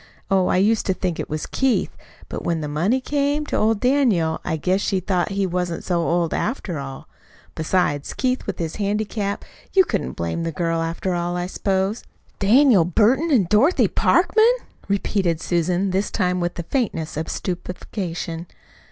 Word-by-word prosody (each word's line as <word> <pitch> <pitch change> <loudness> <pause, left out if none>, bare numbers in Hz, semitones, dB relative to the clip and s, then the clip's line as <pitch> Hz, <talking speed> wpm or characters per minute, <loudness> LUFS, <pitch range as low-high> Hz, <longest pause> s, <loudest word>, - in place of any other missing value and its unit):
Oh, 190 -1 +3
I - - +2
used 210 +4 +2
to 190 - +1
think 180 -3 -2
it - - -4
was 155 0 -3
Keith; 265 -2 0 0.3
but - - -6
when 165 -2 -1
the 150 - -3
money 175 - +1
came 290 +2 0
to - - -3
old 220 -1 +2
Daniel 230 - +2
I 160 -2 -1
guess 185 +5 +1
she 195 -2 0
thought 180 0 0
he 195 -1 0
wasn't 180 -1 -2
so 175 -2 0
old, 170 0 0
after 205 - -2
all. 135 -1 -7 0.5
Besides, 155 -3 0
Keith, 255 0 -1
with - - -3
his 165 -2 -4
handicap 205 0 -2 0.3
you 380 -1 +6
couldn't 200 - -2
blame 85 - -3
the 165 0 -2
girl, 165 +1 -1
after 165 +3 -2
all, 175 0 -1
I 175 - -1
s'pose." 195 +3 -1 0.4
"Daniel 225 - +5
Burton 230 - +2
an' 245 - +4
Dorothy 260 - +4
Parkman!" 445 +2 +4 0.4
repeated 195 -4 0
Susan, 180 +3 0
this 190 +2 0
time 180 0 0
with 175 0 -2
the 170 - -4
faintness 165 - -2
of 155 +2 -3
stupefaction. 175 -2 -4
185 Hz, 170 wpm, -22 LUFS, 170-215 Hz, 0.5 s, you